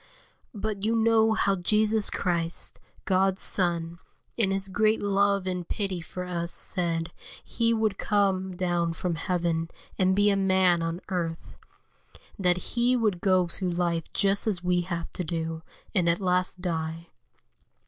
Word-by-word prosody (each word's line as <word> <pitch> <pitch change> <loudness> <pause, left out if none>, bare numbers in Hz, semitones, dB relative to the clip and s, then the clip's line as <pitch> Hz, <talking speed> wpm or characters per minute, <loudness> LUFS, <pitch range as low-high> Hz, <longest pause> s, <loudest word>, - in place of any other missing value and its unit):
But 205 -1 -3
you 225 +2 +1
know 225 -1 +4
how 200 -2 +2
Jesus 210 +3 +2
Christ, 170 -2 -1 0.3
God's 190 +1 +2
Son, 170 -2 0 0.4
in 220 -5 +1
His 195 0 0
great 215 +3 +1
love 200 -1 +2
and 180 -2 -3
pity 195 -4 -2
for 180 +2 -7
us 170 -1 -3
said 170 -2 0 0.3
He 230 -1 0
would 220 -3 0
come 190 -3 +1
down 175 -2 0
from 175 +1 -2
heaven, 165 -1 -1 0.3
and 190 0 +3
be 205 +1 +4
a - - +2
man 190 -3 +3
on 165 +2 -3
earth; 170 -3 -4 0.8
that 180 -2 +3 0.2
He 245 +1 +2
would 210 -7 0
go 185 -2 +3
through 175 +1 -3
life 170 -2 0
just 200 +2 +1
as 185 -5 -1
we 180 0 +2
have 170 -2 -5
to 180 - -3
do, 165 0 -3 0.3
and 180 -4 +2
at 170 - +1
last 180 -1 +1
die. 165 -1 -3
185 Hz, 150 wpm, -27 LUFS, 170-200 Hz, 0.8 s, know